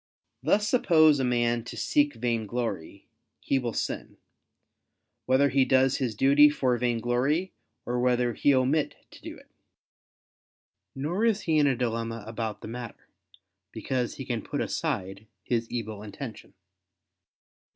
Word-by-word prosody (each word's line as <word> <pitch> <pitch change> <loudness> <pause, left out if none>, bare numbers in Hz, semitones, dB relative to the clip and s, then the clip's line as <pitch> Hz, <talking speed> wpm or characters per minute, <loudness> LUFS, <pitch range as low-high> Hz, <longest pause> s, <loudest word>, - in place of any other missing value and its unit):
Thus 210 +1 +2
suppose 155 - +4
a - - 0
man 120 -1 +1
to - - -8
seek 145 -2 +1
vainglory, 115 -5 -3 0.3
he 135 - 0
will 120 -2 -3
sin, - - -4 1.1
whether 140 +2 +4
he 135 +1 +3
does 130 0 +3
his 125 -5 -2
duty 140 +5 +6
for 130 -4 0
vainglory 125 +9 0 0.3
or 125 0 -2
whether 125 -1 +1
he 145 - +2
omit 135 +4 +1 0.2
to - - -15
do - - -8
it. - - -20 1.4
Nor 160 +10 -2
is 220 -3 +2
he 160 -2 +1
in 145 - +4
a 135 - +2
dilemma 115 -2 -3
about 110 -1 -5
the - - -8
matter: 120 0 -8 0.6
because 125 +2 -3
he - - -7
can - - -2
put - - -5
aside 95 +3 -3 0.2
his 115 -1 -1
evil 110 -3 -5
intention. 110 +3 -9
125 Hz, 140 wpm, -27 LUFS, 115-140 Hz, 1.4 s, duty